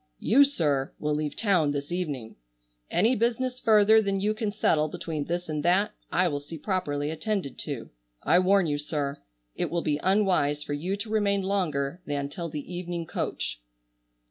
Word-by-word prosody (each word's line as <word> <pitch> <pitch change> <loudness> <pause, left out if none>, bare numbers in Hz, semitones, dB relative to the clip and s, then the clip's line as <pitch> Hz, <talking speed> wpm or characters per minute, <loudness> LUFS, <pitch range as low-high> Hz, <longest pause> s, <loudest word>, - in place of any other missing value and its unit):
You, 275 +6 +5
sir, 145 - 0
will 150 0 -1
leave 150 -1 -2
town 180 -8 +2
this 145 +2 -4
evening. 145 -11 -3 0.5
Any 225 +8 +3
business 245 +3 0
further 220 -1 +6
than 195 -2 -1
you 210 +2 +1
can 215 -1 -2
settle 155 -7 +2
between 155 -1 -4
this 175 +1 -3
and 155 -1 -2
that 185 +6 +3 0.2
I 180 +1 +3
will 145 -4 -1
see 145 +3 -9
properly 150 -5 -1
attended 195 -3 -3
to. - - -5 0.3
I 175 - +5
warn 190 0 +4
you, 145 -2 -1
sir, 145 -1 -3 0.3
it - - -1
will 170 0 -1
be 150 -2 0
unwise 185 -7 +2
for 145 - -4
you 180 +7 -2
to 215 +1 -5
remain 200 -2 +2
longer 175 -5 -1
than 140 -1 -2
till 170 +2 -5
the 150 +3 -6
evening 175 -1 -4
coach." - - -3
175 Hz, 175 wpm, -27 LUFS, 145-200 Hz, 0.5 s, further